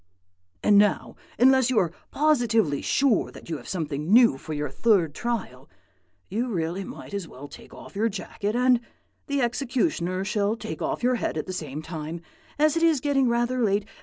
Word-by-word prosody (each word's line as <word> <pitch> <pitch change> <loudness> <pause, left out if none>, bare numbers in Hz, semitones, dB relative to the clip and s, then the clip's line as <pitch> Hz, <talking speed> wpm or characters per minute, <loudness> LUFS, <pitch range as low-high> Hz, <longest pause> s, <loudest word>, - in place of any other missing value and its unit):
And 205 -1 +6
now, 205 -2 +1 0.2
unless 260 0 +5
you 255 - 0
are 175 -5 +2 0.2
positively 230 - +2
sure 270 -7 +2
that - - -11
you 160 - -1
have - - -13
something 155 -2 -3
new 235 - +6
for 155 - -6
your 145 -2 -3
third 180 -4 +2
trial, 235 +4 -4 0.6
you 230 +5 -2
really 180 -3 -2
might 200 - -10
as 200 -4 -4
well 140 0 -10
take - - -14
off - - -13
your 220 +3 +1
jacket; 205 +2 -4
and 250 0 +4 0.5
the 280 -2 0
executioner 235 - -1
shall 205 +1 0
take 160 -8 -7
off - - -2
your 250 +1 +3
head - - -2
at 155 - -2
the 185 - -5
same 155 -3 -5
time, 160 0 -6 0.4
as 305 +1 +3
it 330 - 0
is 325 -4 +4
getting 270 -2 +2
rather 240 +2 0
late. 205 -1 +1
210 Hz, 185 wpm, -25 LUFS, 170-250 Hz, 0.6 s, And